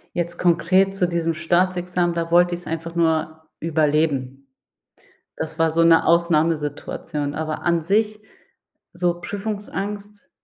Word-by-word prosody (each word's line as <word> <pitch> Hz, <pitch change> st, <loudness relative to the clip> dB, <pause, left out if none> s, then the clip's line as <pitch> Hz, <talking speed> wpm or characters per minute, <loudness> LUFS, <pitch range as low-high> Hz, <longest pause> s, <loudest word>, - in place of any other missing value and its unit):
Jetzt 175 Hz, 0 st, -2 dB
konkret 185 Hz, +3 st, +3 dB
zu 180 Hz, -2 st, +1 dB
diesem 165 Hz, -1 st, -1 dB
Staatsexamen, 175 Hz, +1 st, 0 dB
da 165 Hz, 0 st, -3 dB
wollt 175 Hz, +1 st, +4 dB
ich's 175 Hz, 0 st, -5 dB
einfach 165 Hz, +1 st, -5 dB
nur 160 Hz, -1 st, 0 dB
überleben. 150 Hz, -4 st, 0 dB, 0.9 s
Das 160 Hz, +1 st, -5 dB
war 165 Hz, -1 st, +2 dB
so 165 Hz, +1 st, +3 dB
'ne 165 Hz, -1 st, +5 dB
Ausnahmesituation. 155 Hz, -3 st, 0 dB
Aber 155 Hz, 0 st, -3 dB
an 170 Hz, -1 st, +2 dB
sich, 210 Hz, +5 st, +1 dB, 0.7 s
so 175 Hz, -1 st, -1 dB
Prüfungsangst, 205 Hz, 0 st, -5 dB
170 Hz, 120 wpm, -22 LUFS, 160-180 Hz, 0.9 s, ne